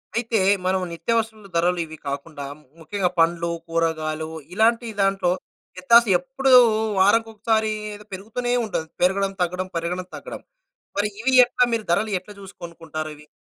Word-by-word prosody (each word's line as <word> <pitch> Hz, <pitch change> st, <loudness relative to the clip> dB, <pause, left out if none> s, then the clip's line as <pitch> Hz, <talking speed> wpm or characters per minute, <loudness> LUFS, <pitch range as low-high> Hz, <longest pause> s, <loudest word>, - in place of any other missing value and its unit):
అయితే, 230 Hz, -1 st, 0 dB, 0.3 s
మనం 185 Hz, 0 st, +1 dB
నిత్యావసరాల 220 Hz, +3 st, -2 dB
ధరలు 175 Hz, +1 st, +2 dB
ఇవి 160 Hz, 0 st, -11 dB
కాకుండా, 140 Hz, +1 st, -5 dB, 0.3 s
ముఖ్యంగా 180 Hz, +3 st, -1 dB
పండ్లు, 170 Hz, +1 st, +2 dB, 0.2 s
కూరగాయలు 160 Hz, -1 st, -1 dB, 0.2 s
ఇలాంటీ 230 Hz, +3 st, +2 dB
దాంట్లో 195 Hz, -2 st, +2 dB, 0.5 s
వ్యత్యాస 235 Hz, +6 st, +6 dB
ఎప్పుడూ 270 Hz, 0 st, -1 dB, 0.5 s
వారంకొకసారీ, 220 Hz, +1 st, +2 dB, 0.2 s
ఏదో 210 Hz, 0 st, -13 dB
పెరుగుతూనే 225 Hz, +6 st, -3 dB
ఉంటది. 160 Hz, -7 st, -3 dB
పెరగడం-తగ్గడం, 185 Hz, -1 st, 0 dB
పెరగడం-తగ్గడం. 180 Hz, +2 st, -5 dB, 0.6 s
మరి 205 Hz, +1 st, +1 dB
ఇవి 260 Hz, +2 st, +1 dB
ఎట్లా 250 Hz, +1 st, +1 dB
మీరు 225 Hz, -1 st, 0 dB
ధరలు 210 Hz, +5 st, +1 dB
ఎట్ల 195 Hz, +3 st, -15 dB
జూసి 195 Hz, -1 st, -11 dB
కొనుక్కుంటారవి? 155 Hz, -3 st, -7 dB
190 Hz, 120 wpm, -23 LUFS, 170-220 Hz, 0.6 s, వ్యత్యాస